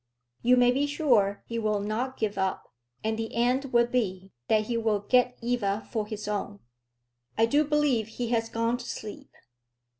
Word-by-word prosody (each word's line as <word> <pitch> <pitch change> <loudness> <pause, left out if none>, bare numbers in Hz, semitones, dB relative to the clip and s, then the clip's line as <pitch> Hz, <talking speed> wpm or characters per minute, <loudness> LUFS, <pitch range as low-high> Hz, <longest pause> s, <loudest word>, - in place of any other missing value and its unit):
You 250 +1 +4
may 245 0 +5
be 275 +3 +1
sure 240 -10 +2
he 230 0 -3
will 215 -2 0
not 225 +6 -3
give 215 -2 -1
up; 190 -8 -2 0.3
and 220 0 -1
the 225 0 -4
end 250 +4 +2
will 240 -3 +3
be, 195 -6 -2 0.2
that 215 -1 +3
he 235 +2 -3
will 220 -3 +1
get 250 +3 +2
Eva 220 -4 -1
for 220 -3 -2
his 210 -1 -6
own. 205 0 -3 0.8
I 225 - +5
do 285 +6 +3
believe 290 -7 +1
he 235 +1 -4
has 225 -1 0
gone 230 +1 0
to 245 - -9
sleep." 210 -1 -7
230 Hz, 180 wpm, -27 LUFS, 210-245 Hz, 0.8 s, may